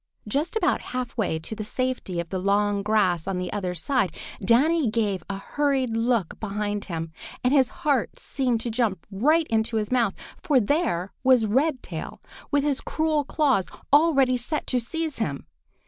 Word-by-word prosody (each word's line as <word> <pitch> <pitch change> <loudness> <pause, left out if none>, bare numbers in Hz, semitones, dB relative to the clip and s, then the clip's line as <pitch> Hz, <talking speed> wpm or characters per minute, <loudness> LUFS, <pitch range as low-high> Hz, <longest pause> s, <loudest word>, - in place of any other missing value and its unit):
Just 290 - -1
about 445 - +2 0.2
half 250 -2 -3
way 205 -8 0
to 160 +7 -6
the 215 - -4
safety 250 -6 -2
of 170 -1 -4
the 185 - -2
long 200 +1 +2
grass 195 -5 +1
on 195 -1 -1
the 180 0 -3
other 185 -3 -2
side, 200 - 0 0.3
Danny 275 - +3
gave 210 -4 0
a 200 - -3
hurried 265 +1 0
look 230 -5 0
behind 205 -1 -3
him, 165 -3 -4 0.3
and 250 +2 +3
his 265 -3 +4 0.2
heart 280 -6 +1
seemed 250 -5 -1
to 235 - -3
jump 220 -6 -1
right 305 +12 +3
into 225 0 +1
his 210 +1 -2
mouth, 235 -5 +2 0.3
for 285 -4 +3
there 205 - 0
was 255 -4 +5
Redtail 265 +6 -1 0.3
with 285 -1 +2
his 285 -2 +1
cruel 310 -2 0
claws 270 - +1 0.3
already 275 -5 +5
set 295 +6 -3
to 250 - +1
seize 315 +5 -3
him! 145 -11 -2
230 Hz, 170 wpm, -25 LUFS, 200-275 Hz, 0.3 s, was